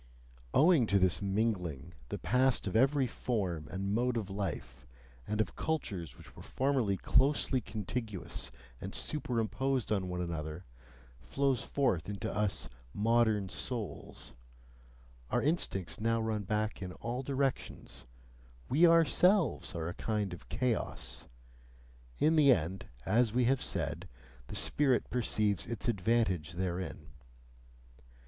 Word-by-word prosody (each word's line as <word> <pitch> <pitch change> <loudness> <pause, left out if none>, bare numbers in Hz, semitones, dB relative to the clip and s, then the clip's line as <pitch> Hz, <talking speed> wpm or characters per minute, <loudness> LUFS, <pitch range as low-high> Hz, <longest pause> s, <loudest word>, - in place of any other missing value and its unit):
Owing 150 -5 +5
to 100 - +3
this 95 -1 +2
mingling, 95 - -1 0.2
the - - -3
past 130 +4 +2
of 95 - -3
every 135 +3 +4
form 95 -10 -2
and 100 +1 -2
mode 120 +2 +1
of 100 -4 -3
life, 95 -11 -5 0.4
and 105 +1 -2
of 110 - 0
cultures 100 - -3
which - - -15
were - - -10
formerly 130 -8 0
closely 135 +3 +2
contiguous 110 -1 -3 0.3
and - - -5
superimposed 125 -2 -1
on 95 -3 0
one 90 0 -3
another, 80 -1 -4 0.5
flows 130 - 0
forth 100 - 0
into 105 0 -4
us 105 -1 0 0.3
"modern 110 -2 +3
souls"; 115 +1 -6 1.0
our - - +2
instincts 135 - 0
now 115 +1 +1
run 110 -2 -1
back 105 +1 -1
in 90 -1 -5
all 120 +6 -4
directions, 135 - -3 0.6
we 160 +6 +6
ourselves 165 - +3
are 80 -1 -2
a 85 - -3
kind 105 -3 -2
of 90 - -11
chaos: 125 -3 -2 0.9
in 160 +1 +3
the 145 -3 +7
end, 95 -3 0 0.2
as 110 +2 +3
we 125 0 +3
have 130 +1 +2
said, - - -3 0.4
the - - -7
spirit 135 -4 +2
perceives 105 -5 +1
its 120 +3 -4
advantage 100 -6 +1
therein. 90 0 -4
110 Hz, 125 wpm, -32 LUFS, 95-130 Hz, 1.0 s, the